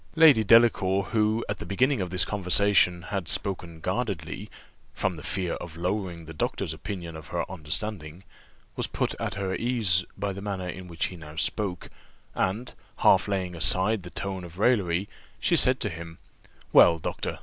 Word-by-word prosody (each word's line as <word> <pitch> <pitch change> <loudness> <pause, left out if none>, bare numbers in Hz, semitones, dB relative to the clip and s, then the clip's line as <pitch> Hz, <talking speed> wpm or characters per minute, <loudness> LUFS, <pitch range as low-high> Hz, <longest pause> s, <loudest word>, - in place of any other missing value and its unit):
Lady 155 -9 +7
Delacour, 100 -3 +5
who, 110 +1 +1
at 105 -2 -3
the - - -5
beginning 125 +6 +1
of 90 - -2
this 90 +1 +2
conversation, 90 -2 +2
had 95 -5 -2
spoken 90 -4 -4
guardedly, 95 -1 -3 0.5
from 95 -2 -1
the 80 - -9
fear 95 0 -2
of 85 -2 -7
lowering 90 -2 -3
the 80 - -9
doctor's 75 0 -2
opinion 85 -1 -6
of 80 -1 -9
her 85 -1 -2
understanding, 85 0 -4 0.5
was - - +1
put - - -1
at - - -3
her 95 -2 -2
ease 110 -7 +2
by 100 -1 -2
the 100 - -7
manner 95 -3 -4
in 90 +1 -7
which 85 -1 -2
he - - -8
now 75 -2 -11
spoke; 90 +1 -1 0.4
and, 110 +7 -1 0.3
half - - +5
laying 95 -3 -2
aside 95 +5 +2
the 90 - -9
tone 95 +2 -4
of 85 0 -11
raillery, 100 -5 +2 0.3
she - - +2
said 130 0 +4
to 110 - -1
him, 85 -1 -8 0.6
"Well, 85 - +7
doctor! 80 - -4
95 Hz, 170 wpm, -27 LUFS, 85-105 Hz, 0.6 s, Lady